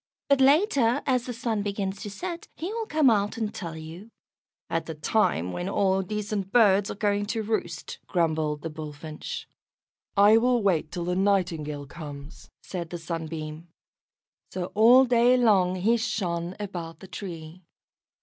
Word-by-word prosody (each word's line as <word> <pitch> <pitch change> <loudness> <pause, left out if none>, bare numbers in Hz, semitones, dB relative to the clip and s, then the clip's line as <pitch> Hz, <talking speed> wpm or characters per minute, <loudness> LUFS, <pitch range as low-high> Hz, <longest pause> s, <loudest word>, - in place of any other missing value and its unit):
But 280 -1 +4
later, 275 - +4
as 255 -2 +1
the 245 - -3
Sun 225 -2 -2
begins 200 -1 -3
to 210 - -5
set, 340 - -6
he 355 +6 -4
will 455 -1 -3
come 305 -6 +3
out 205 -1 0
and 220 -2 -2
tell 165 -4 -6
you." 165 +7 -9 0.6
"At 165 - -2
the 160 - -5
time 150 - +1
when 175 - -3
all 190 -1 +2
decent 205 0 -3
birds 205 -4 +4
are - - -4
going 205 0 0
to 220 +1 -2
roost," 205 -7 -3
grumbled 155 -3 0
the 165 - -4
Bullfinch. 155 - -7 0.7
"I 205 +2 +7
will 245 -1 +2
wait 165 -6 +1
till 175 -1 -4
the 180 0 -1
Nightingale 170 -7 0
comes," 145 -1 -10
said 175 -3 -5
the 175 - -5
Sunbeam. 160 -1 -5 0.8
So 180 -1 -4
all 240 +5 +7
day 245 0 +4
long 195 -7 +3
he 215 +6 +2
shone 185 -6 -2
about 175 -5 -6
the 190 - -11
tree. 175 -3 -8
195 Hz, 160 wpm, -26 LUFS, 165-225 Hz, 0.8 s, I